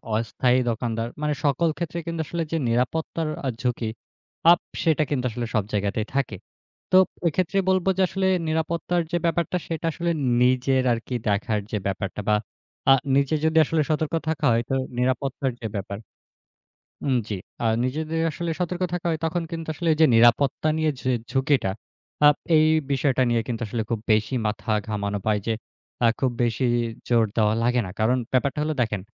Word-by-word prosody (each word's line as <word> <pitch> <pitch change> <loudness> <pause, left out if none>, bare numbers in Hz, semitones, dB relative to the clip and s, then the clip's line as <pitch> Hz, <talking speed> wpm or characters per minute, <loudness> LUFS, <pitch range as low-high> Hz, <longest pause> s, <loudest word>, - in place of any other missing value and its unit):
অস্থায়ী 125 +3 +1
দোকানদার 115 0 -2
মানে 150 0 +1
সকল 145 +4 +2
ক্ষেত্রে 170 0 -3
কিন্তু 165 -1 -2
আসলে 170 -1 -2
যে, 165 - +1
নিরাপত্তার 155 +6 -1 0.2
আ - - 0
ঝুঁকি 120 -3 -1 0.6
আপ 175 - +5 0.2
সেটা 155 -2 +3
কিন্তু 130 -4 -1
আসলে 120 +2 -3
সব 105 - +2
জায়গাতেই 105 +1 0
থাকে। 130 -7 0 0.6
তো 185 - +7 0.3
এক্ষেত্রে 180 +4 0
বলব 185 -1 +2
যে, 190 - +2
আসলে 190 -1 0 0.2
নিরাপত্তার 165 +2 0
যে, 175 - +2
ব্যাপারটা 170 +1 0
সেটা 165 0 -4
আসলে 170 +2 -1 0.3
নিজের 130 +1 +3
আরকি 120 +2 -4
দেখার 105 +1 0
যে, 105 - 0
ব্যাপারটা 100 0 -3
বা 105 - +5 0.6
আ - - +10 0.2
নিজে 140 +2 +2
যদি 160 0 +2
আসলে 160 0 +1
সতর্ক 155 0 0 0.2
থাকা 160 - -1
হয় 115 +1 +2
তো 135 - +1 0.2
নিরাপত্তার 130 +1 0
যে, 110 - -3
ব্যাপার। 100 0 -4 1.1
উম 130 - +2
জ্বি। 105 -3 -3 0.3
আ - - +3 0.2
নিজেদের 155 +5 -2
আসলে 170 +2 -4
সতর্ক 180 +1 -2
থাকা 175 -1 -3
হয়, 160 - -1
তখন 170 +1 -1
কিন্তু 165 -1 -5
আসলে 165 +2 0
যে, 160 - +8
নিরাপত্তা 120 +6 +4
নিয়ে 155 -1 +2 0.4
ঝুঁকিটা। 135 -7 +2 0.5
আ - - +10 0.3
এই 155 - +5 0.3
বিষয়টা 135 -1 +2
নিয়ে 120 -1 +2
কিন্তু 120 -1 -3
আসলে 115 +2 -2
খুব 115 -2 -1
বেশি 110 +4 +1
মাথা 105 +2 -3 0.2
ঘামানো 105 -1 -2
পায় 105 -1 +2
যে, 115 - +1 0.5
আ - - +7
খুব 130 - +2
বেশি 120 +2 0 0.4
জোর 115 -2 +4
দেওয়া 110 -1 +3
লাগে 125 +1 +2
না। - - -6
কারণ 120 +4 +3 0.2
ব্যাপারটা 135 +3 +1
হলো 155 +1 -1
দেখেন, 105 -4 -2
130 Hz, 170 wpm, -24 LUFS, 115-160 Hz, 1.1 s, আ